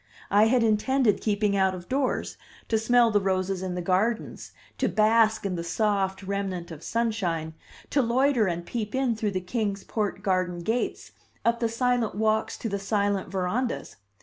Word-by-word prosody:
I 205 +2 +6
had 245 0 +3
intended 225 +1 +2
keeping 205 -1 +1
out 190 -1 +2
of 175 -1 -10
doors, 265 0 -1 0.3
to 220 - +2
smell 240 +1 +4
the 205 - +3
roses 190 0 -1
in 185 -1 -3
the 180 - -3
gardens, 210 +6 -1 0.3
to - - +2
bask 220 0 +3
in 195 - -1
the 170 -1 -3
soft 195 +1 0
remnant 190 -3 -3
of 160 -2 -9
sunshine, 185 -9 -1 0.4
to 285 - +3
loiter 250 -1 +2
and 170 -1 -3
peep 215 0 -4
in 260 -3 +1
through 215 -1 -1
the 185 -2 -2
Kings 200 0 -2
Port 205 -3 -3
garden 185 -3 0
gates, 225 +7 -2 0.3
up 235 0 +2
the 230 - 0
silent 240 -2 0
walks 220 +1 0
to - - -4
the 200 -2 -2
silent 200 -1 0
verandas. 190 - -2
210 Hz, 175 wpm, -26 LUFS, 190-230 Hz, 0.4 s, I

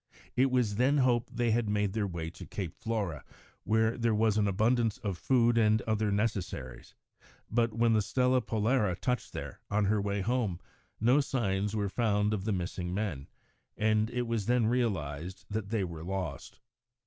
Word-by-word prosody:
It 130 +2 +4
was 120 -5 +1
then 135 +4 +3
hoped 125 -3 +2
that - - -17
they 120 -1 +2
had 110 -1 +1
made 105 -2 0
their 105 -2 0
way 85 -3 -5
to - - -11
Cape 90 -4 -5
Flora, 105 -9 -2 0.4
where 110 +1 +2
there 115 -2 +2
was 110 -1 +2
an 105 -1 +2
abundance 110 +3 +2
of 100 -4 -3
food 120 +3 +3
and 110 -1 +4
other 110 -1 0
necessaries, 100 - -3 0.6
but 115 0 +2
when 115 0 +3
the 110 - +4
Stella 125 +4 +2
Polare 110 -4 +1
touched 125 -3 -1
there, - - -7
on 100 0 +1
her 105 +1 +2
way 100 0 -1
home, 110 -4 0 0.4
no 125 +6 +4
signs 105 -6 -1
were 105 -2 0
found 105 -1 +1
of 100 -2 -3
the 110 - 0
missing 90 -1 -3
men, 95 -10 -3 0.5
and 110 0 +2
it 125 0 -1
was 115 -3 -2
then 120 -1 +3
realised 95 - -2
that 105 -2 -3
they 110 -3 0
were 85 -3 -6
lost. 95 +1 -5
110 Hz, 180 wpm, -30 LUFS, 100-115 Hz, 0.6 s, It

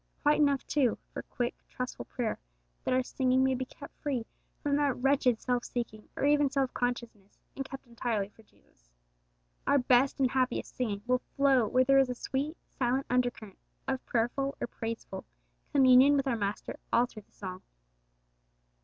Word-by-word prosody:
Quite 295 +1 +4
enough, 280 -2 +3
too, 265 -6 +2 0.2
for - - -4
quick, 245 0 -3 0.2
trustful 250 0 -5
prayer 240 -4 -3 0.4
that - - 0
our 255 - +2
singing 260 0 +2
may 265 0 +3
be 260 0 -2
kept 280 +2 -12
free 265 -6 -1 0.4
from 285 -2 +2
that 285 -3 +1
wretched 260 -3 +3
self 245 -1 0
seeking 225 -3 -5
or - - 0
even 290 -1 +4
self 270 -1 0
consciousness, 235 -5 -3 0.2
and 270 - -3
kept 270 0 -8
entirely 230 -4 -2
for 215 - -20
Jesus. - - -30 0.8
Our 285 - +5
best 260 +1 +3
and 260 -2 +3
happiest 260 -1 0
singing 210 -5 -2
will 250 0 +2
flow 270 -5 +4
when 255 +4 +4
there 275 +1 +5
is 265 -1 +3
a 250 - -2
sweet, 280 +6 -3 0.2
silent 260 +1 +1
undercurrent 245 -5 -1 0.3
of 265 -1 -1
prayerful 260 +4 0
or - - -1
praiseful 225 -4 -6 0.5
communion 270 +1 +7
with 275 - +1
our 265 -3 +1
Master 205 -2 -3
all 235 +1 +5
through 230 -3 -11
the - - -36
song. 185 -2 -7
255 Hz, 170 wpm, -30 LUFS, 235-275 Hz, 0.8 s, communion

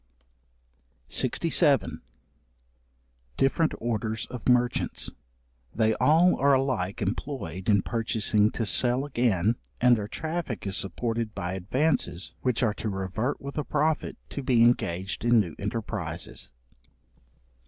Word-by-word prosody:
§67. - - +2 1.4
Different 155 +4 +2
orders 110 -1 -2
of 125 0 -3
Merchants. 125 -1 +1 0.6
They 110 0 +3
all 165 +9 +4
are 140 0 +4
alike 120 -9 -1
employed 95 - -4
in 100 -2 +4
purchasing 110 -2 +1
to 115 - -1
sell 125 +5 +2
again, 115 -6 +1 0.2
and 125 0 +6
their 105 -2 -3
traffic 155 -1 -4
is 95 -1 -1
supported 115 +2 -2
by 90 -1 -3
advances 105 - -1
which 125 -1 0
are 110 -3 +2
to 110 - -4
revert 95 +6 -2
with 140 +2 -5
a - - -1
profit, 150 +2 0
to 140 - -4
be 125 -3 +4
engaged 95 -6 +1
in 120 -1 +5
new 85 -7 -1
enterprizes. 105 +2 -4
115 Hz, 120 wpm, -27 LUFS, 100-130 Hz, 1.4 s, and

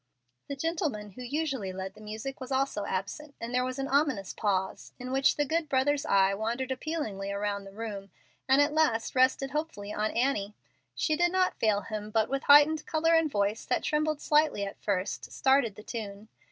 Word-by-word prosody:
The 280 - -4
gentleman 280 - -2
who 250 - -11
usually 270 -6 -2
led 190 +1 -6
the 215 - -15
music 220 +6 -6
was 255 +1 -7
also 265 -6 0
absent, 280 +10 -4
and 235 +1 -5
there 250 0 +2
was 255 +1 -3
an 270 0 -2
ominous 275 -8 +1
pause, 190 -3 -2
in 255 0 -6
which 270 +1 +3
the 295 - +2
good 315 +1 -1
brother's 285 +3 +1
eye 195 -3 +4
wandered 235 +6 -2
appealingly 255 -9 -3
around 200 0 -2
the 195 - -10
room 200 -2 -6 0.4
and 270 +2 +6
at 290 +1 -1
last 300 -8 +1
rested 260 +1 +2
hopefully 290 -9 -4
on 215 +1 0
Annie. 225 -5 0 0.4
She 310 - +1
did 350 +2 +2
not 370 0 +1
fail 210 -2 +2
him, 215 -1 -6
but, 220 0 +1
with 275 0 -1
heightened 295 +2 +6
color 325 +1 +2
and 325 -1 +4
voice 205 -2 0
that - - 0
trembled 305 -1 0
slightly 300 -9 +2
at 195 - -8
first, 195 -1 -2
"started 265 -6 +2
the 210 - -11
tune." 215 -2 -7
255 Hz, 195 wpm, -29 LUFS, 205-290 Hz, 0.4 s, and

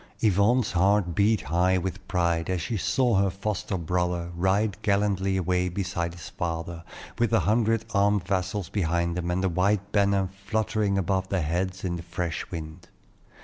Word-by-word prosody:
Yvonne's 105 +4 +3
heart 95 0 +2
beat 105 +3 +3
high 90 +2 +2
with 95 +1 -4
pride 85 -2 0
as 95 -1 0
she 110 +8 -3
saw 120 - +2
her 100 0 +3
foster 100 +1 -3
brother 90 0 -1
ride 95 +3 +1
gallantly 100 -1 +1
away 90 0 +1
beside 90 -2 -3
his 85 - -9
father, 85 0 -4 0.4
with 120 -1 +2
a 115 -4 +4
hundred 110 +4 +2
armed 100 -1 +3
vassals 95 0 -1
behind 85 -3 0
them, 90 -1 -2
and 90 +2 0
the - - +3
white 100 +3 +1
banner 100 -2 +2 0.2
fluttering 110 -2 0
above 95 0 0
their 95 -4 0
heads 90 +4 -2
in 85 -2 -2
the - - -6
fresh 85 -2 -4
wind. 80 0 -7
95 Hz, 165 wpm, -26 LUFS, 85-100 Hz, 0.4 s, a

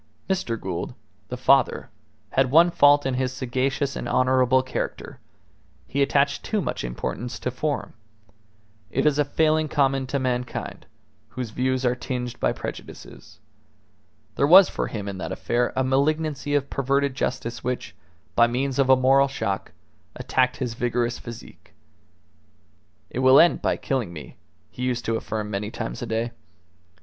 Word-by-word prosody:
Mr. 150 - -1
Gould, 90 -2 -5 0.3
the - - -5
father, - - +2 0.4
had 130 -1 +2
one 165 +5 +6
fault 145 -2 +5
in 135 - 0
his 130 0 -1
sagacious 130 +2 -2
and - - -4
honourable 130 0 +3
character: 130 - -5 0.7
he 140 - -2
attached 140 0 +2
too 215 - -1
much - - -3
importance 65 - -4
to 125 - -3
form. 145 +4 -3 1.0
It - - -1
is 150 -1 +3
a - - +5
failing 155 +2 +1
common 135 -3 +1
to 140 - -1
mankind, 125 -2 -3 0.4
whose 125 -4 -6
views 130 +2 -1
are 125 - +3
tinged 125 -1 -5
by - - +2
prejudices. - - -9 1.0
There 140 - +3
was 185 +4 +8
for - - -3
him 105 -3 -5
in 100 -2 -5
that - - -5
affair 120 +1 0
a 130 - +1
malignancy 145 +2 0
of 140 -1 -1
perverted 140 +1 0
justice 125 -2 -3
which, 125 0 -3 0.4
by 120 - +6
means 130 +3 -2
of 135 -1 +3
a 130 - +8
moral 135 +2 +4
shock, 100 -7 -3 0.4
attacked 130 -1 0
his 125 -4 -3
vigorous 120 0 -1
physique. 120 -2 -12 1.4
"It - - -4
will 130 +1 +7
end 170 - +5
by - - 0
killing 130 - -2
me," 80 -3 -10 0.3
he - - -9
used 125 -2 -1
to 115 - 0
affirm 105 -1 -4
many 100 +1 -3
times - - -5
a - - -4
day. 115 +1 -2
130 Hz, 155 wpm, -24 LUFS, 120-140 Hz, 1.4 s, was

